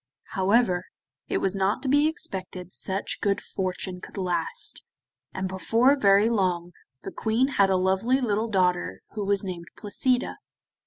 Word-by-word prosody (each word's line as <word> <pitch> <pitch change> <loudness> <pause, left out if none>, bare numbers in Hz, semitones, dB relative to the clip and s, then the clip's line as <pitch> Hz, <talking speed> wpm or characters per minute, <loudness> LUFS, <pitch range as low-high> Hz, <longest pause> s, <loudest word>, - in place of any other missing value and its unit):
However, 190 -2 +2 0.4
it - - 0
was 195 0 0
not 195 +6 0
to - - -2
be 290 +3 +4
expected 185 - -5
such 195 +1 -2
good 200 -1 +1
fortune 185 -2 -4
could - - -11
last, 185 - -1 0.5
and 190 0 -3
before 225 +8 +3
very 200 -4 +5
long 180 -6 0 0.3
the - - -5
Queen 230 +5 +1
had 200 -8 +3
a 190 - +3
lovely 190 +8 +2
little 220 -3 0
daughter 180 - +1
who 210 - -4
was 200 0 +1
named 175 -3 -6
Placida. 245 +4 0
195 Hz, 150 wpm, -26 LUFS, 185-230 Hz, 0.5 s, very